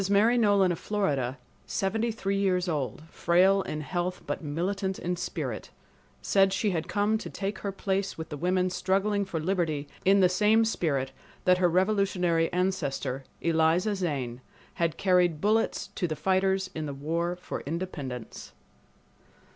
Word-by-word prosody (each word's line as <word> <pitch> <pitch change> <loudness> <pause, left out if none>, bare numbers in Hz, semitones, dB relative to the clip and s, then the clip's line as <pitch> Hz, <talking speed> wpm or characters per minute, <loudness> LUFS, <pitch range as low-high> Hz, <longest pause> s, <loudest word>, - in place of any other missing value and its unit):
Mary 210 +4 +4
Nolan 205 -5 +4
of 170 - -3
Florida, 145 - -1 0.3
seventy 220 +4 0
three 200 -3 -1
years 185 -2 +1
old, 150 -2 -2
frail 185 +3 +4
in 155 -4 -4
health 175 +3 -3
but - - -4
militant 190 +6 -2
in 180 +1 -2
spirit, - - -4 0.5
said 195 -1 +4
she 200 +2 +1
had 165 -3 -2
come 210 +1 +1
to - - -7
take 200 +1 -4
her 200 - -3
place 195 0 -2
with 160 -1 -6
the 150 - -5
women 180 +3 +1
struggling 195 +3 +1
for 175 -4 -3
liberty 160 -4 -1 0.2
in 195 +1 +5
the 185 - +6
same 210 +5 +3
spirit 140 - -1 0.3
that 180 0 +5
her 180 -1 +4
revolutionary 180 -3 +2
ancestor, 140 -7 -1 0.2
Eliza 165 +5 +2
Zane, 135 -10 -3 0.3
had 165 -1 -1
carried 180 -4 +3
bullets 215 +5 +1
to 180 - -1
the 155 - -3
fighters 190 +1 +1
in 155 -1 -4
the 140 - -5
war 165 +5 -1
for 180 - -6
independence. 145 -8 -5
180 Hz, 155 wpm, -28 LUFS, 160-195 Hz, 0.5 s, the